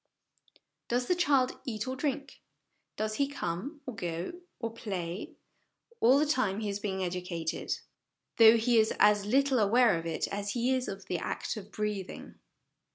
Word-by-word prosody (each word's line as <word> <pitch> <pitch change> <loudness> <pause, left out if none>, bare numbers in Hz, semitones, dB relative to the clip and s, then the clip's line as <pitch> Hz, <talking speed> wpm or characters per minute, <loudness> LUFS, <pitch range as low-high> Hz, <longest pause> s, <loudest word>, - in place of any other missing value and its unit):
Does 245 +1 0
the 360 - +2
child 285 -8 +2
eat 225 -4 -4
or 260 - -2
drink, 275 0 -3 0.6
does 215 0 -1
he 280 - +2
come, 280 - -4
or 255 - -5
go, 175 -2 -3 0.3
or 230 -2 -3
play 190 -5 -5 0.6
all 250 +4 +6
the 300 - +3
time 255 -9 +1
he 215 -2 -2
is 200 0 -3
being 190 -2 -2
educated, 175 -2 -3 0.7
though 225 0 +8
he 230 +1 +3
is 220 - +2
as 205 -1 +5
little 270 +2 +3
aware 220 -3 +4
of 165 - -6
it 165 - -1
as 200 0 -3
he 245 +2 +1
is 255 -1 -1
of 195 0 -6
the 180 -2 -2
act - - -3
of 210 -1 -9
breathing. 210 -3 -4
215 Hz, 165 wpm, -30 LUFS, 190-255 Hz, 0.7 s, though